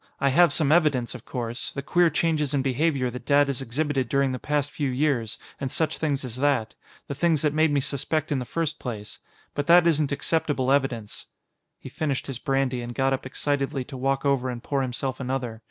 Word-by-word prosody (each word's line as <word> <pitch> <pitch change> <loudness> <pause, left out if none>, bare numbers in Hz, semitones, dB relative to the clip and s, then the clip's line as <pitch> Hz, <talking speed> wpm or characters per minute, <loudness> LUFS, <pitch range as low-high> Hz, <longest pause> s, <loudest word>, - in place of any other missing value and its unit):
I 140 - +3
have 170 +4 +5
some 145 0 +2
evidence, 150 -8 +3
of 125 -3 -10
course; 120 -2 -4
the 140 - -5
queer 175 +4 +3
changes 150 -3 0
in 135 - +1
behavior 135 -1 +1
that 125 - -9
Dad 145 0 +5
has 140 -2 -2
exhibited 135 0 -1
during 140 -1 +2
the 130 - -4
past 145 +1 -1
few 145 -3 -2
years, 125 -4 0 0.2
and 135 - -2
such 160 +3 -1
things 140 -4 -1
as 125 -1 -5
that. 135 -5 +1 0.3
The - - -3
things 160 0 +1
that 150 -1 +2
made 155 0 +3
me 145 -1 +2
suspect 150 +3 -1
in 140 - +1
the - - -3
first 165 +4 -2
place. 110 -5 -6 0.3
But 145 0 -3
that 175 0 +7
isn't 155 -4 +2
acceptable 145 -3 0
evidence." 130 -6 -1 0.5
He - - -11
finished 145 -4 -2
his 135 -3 -5
brandy 135 -2 0
and 120 0 -6
got 135 0 +2
up 130 0 -3
excitedly 140 -1 -1
to 135 - -10
walk 135 +2 -1
over 135 -2 +1
and 120 -1 -6
pour 140 -1 -1
himself 130 0 -3
another. 125 -3 -3
140 Hz, 210 wpm, -25 LUFS, 130-150 Hz, 0.5 s, that